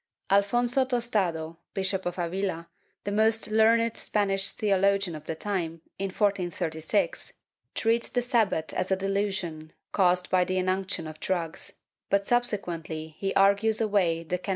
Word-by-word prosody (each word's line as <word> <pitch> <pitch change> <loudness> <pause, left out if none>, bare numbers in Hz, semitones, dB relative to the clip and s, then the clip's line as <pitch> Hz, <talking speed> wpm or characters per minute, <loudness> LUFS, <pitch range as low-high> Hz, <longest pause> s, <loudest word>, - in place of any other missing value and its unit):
Alfonso 240 +6 +3
Tostado, 200 -11 -1 0.2
Bishop 190 -1 -1
of 175 - -4
Avila, 175 -1 -2 0.4
the 205 - -3
most 220 +1 +2
learned 225 +1 +4
Spanish 195 -2 0
theologian 195 -3 +1
of 150 0 -9
the 160 - -3
time, 165 -3 -3 0.2
in 195 - 0
1436 185 - -1 0.4
treats 230 +1 +2
the 245 - 0
Sabbat 220 - +1
as 185 - -1
a 190 - +3
delusion 190 -5 -2 0.2
caused 180 -2 +2
by 185 -1 +4
the 185 +1 -1
inunction 185 -1 -1
of 155 0 -8
drugs, 170 -3 -3 0.4
but 200 0 +2
subsequently 170 -10 -1
he 195 -1 -1
argues 200 +3 +4
away 190 -7 +1
the 180 +2 -2
can. 190 - -8
195 Hz, 140 wpm, -27 LUFS, 170-210 Hz, 0.4 s, learned